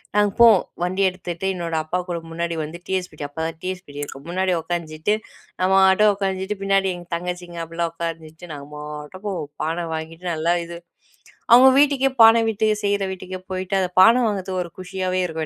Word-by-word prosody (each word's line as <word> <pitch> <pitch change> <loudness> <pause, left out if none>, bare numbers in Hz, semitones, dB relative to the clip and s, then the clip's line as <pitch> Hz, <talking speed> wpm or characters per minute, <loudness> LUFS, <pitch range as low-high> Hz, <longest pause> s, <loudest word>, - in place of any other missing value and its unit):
நாங்க 205 -1 +3
போவோம் 230 -5 +7 0.2
வண்டி 185 +2 0
எடுத்துட்டு 180 -1 -6
என்னோட 170 -2 -3
அப்பா 175 +4 -2
கூட 175 - -1
முன்னாடி 170 0 -2
வந்து 160 +3 -7
டிவிஎஸ்ஃபிப்டி 180 -6 -3
அப்பா 160 +3 -6
தான் 165 - -7
டிவிஎஸ்ஃபிடி 180 -6 -6
இருக்கும். 140 0 -9
முன்னாடி 185 +1 0
உட்காந்துட்டு 165 +2 -2 0.5
நம்ம 185 +1 +3
பாட்டு 190 +3 +5
உக்காஞ்சிட்டு 195 +1 -2
பின்னாடி 195 -1 +2
எங்க 175 -1 -11
தங்கச்சிங்க, 175 0 -5
அப்டிலாம் 165 0 -3
உட்கார்ந்திட்டு 165 0 -6
நாங்க 140 0 -9
பாட்டுக்கு 150 +7 -6 0.3
பான 165 +2 -2
வாங்கிட்டு 160 +2 -7
நல்லா 165 +2 +1
இது, 170 0 -8 0.7
அவங்க 250 +3 +9
வீட்டுக்கே 275 -2 +3
பான 225 +1 +7
விட்டு 220 0 0 0.2
செய்ற 200 -1 +1
வீட்டுக்கே 185 0 -8
போயிட்டு 185 +1 -2
அந்த 180 - -1
பான 225 +4 +8
வாங்கறதுக்கு 190 -3 -2
ஒரு 170 - -11
குஷியாவே 185 0 -2
இருக்கும். 160 -2 -3
180 Hz, 165 wpm, -22 LUFS, 165-190 Hz, 0.7 s, அவங்க